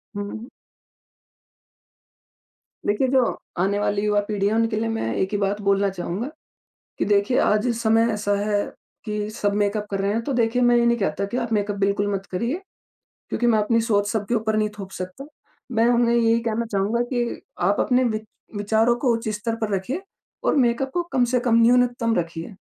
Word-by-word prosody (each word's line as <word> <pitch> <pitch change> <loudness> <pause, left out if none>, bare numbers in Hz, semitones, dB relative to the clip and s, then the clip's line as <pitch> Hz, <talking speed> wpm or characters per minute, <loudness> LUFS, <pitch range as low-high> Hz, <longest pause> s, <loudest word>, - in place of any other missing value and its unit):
हुँ, 205 0 -4
हुँ। 230 +4 -8 2.4
देखिए, 210 +6 +2
जो 255 -2 +2 0.2
आने 200 +2 +1
वाली 205 -1 0
युवा-पीढ़ी 205 -1 +1
है 210 - +1
उनके 225 0 +1
लिए 225 - -1
मैं 115 - -2
एक 190 - -1
ही 205 - 0
बात 200 +1 -1
बोलना 200 0 +2
चाहूँगा 190 +7 -4 0.7
कि - - +1
देखिए, 205 +4 +2
आज 210 +3 +2
इस 235 -1 -1
समय 225 +1 +3
ऐसा 205 -1 0
है 205 0 +1 0.4
कि 210 -1 -3
सब 205 -1 -1
मेकअप 205 +1 -1
कर 195 - -1
रहे 200 +1 +1
हैं 230 - -1
तो 280 - -2
देखिए 240 0 +1
मैं 240 0 +5
ये 235 - +3
नहीं 235 0 +3
कहता 195 0 -1
कि 220 - -4
आप 235 -2 -2
मेकअप 205 -1 0
बिल्कुल 200 +1 +1
मत 195 0 -4
करिए। 235 - -2 0.7
क्योंकि 240 - 0
मैं 225 -2 +4
अपनी 230 +2 +2
सोच 205 -3 +1
सब 210 -2 -2
ऊपर 220 -1 0
नहीं 215 0 +2
थोप 195 -1 -7
सकता 185 +10 -7 0.5
मैं 230 - +4
उन्हें 235 0 +3
यही 230 0 +3
कहना 230 0 -1
चाहूँगा 205 +4 +1
कि 240 -1 -1 0.2
आप 200 +4 +2
अपने 255 0 +3
विच 220 -2 -1 0.3
विचारों 220 +3 +2
को 245 -1 +1
उच्च 230 -1 -3
स्तर 225 +1 -2
पर 210 -2 0
रखिए 255 - -3 0.4
और - - +2
मेकअप 255 +1 +2
को 350 - +1
कम 255 -2 +3
से 250 - +3
कम 240 -2 +1
न्यूनतम 240 -1 +3
रखिए। 170 +3 -4
215 Hz, 195 wpm, -23 LUFS, 205-235 Hz, 2.4 s, मैं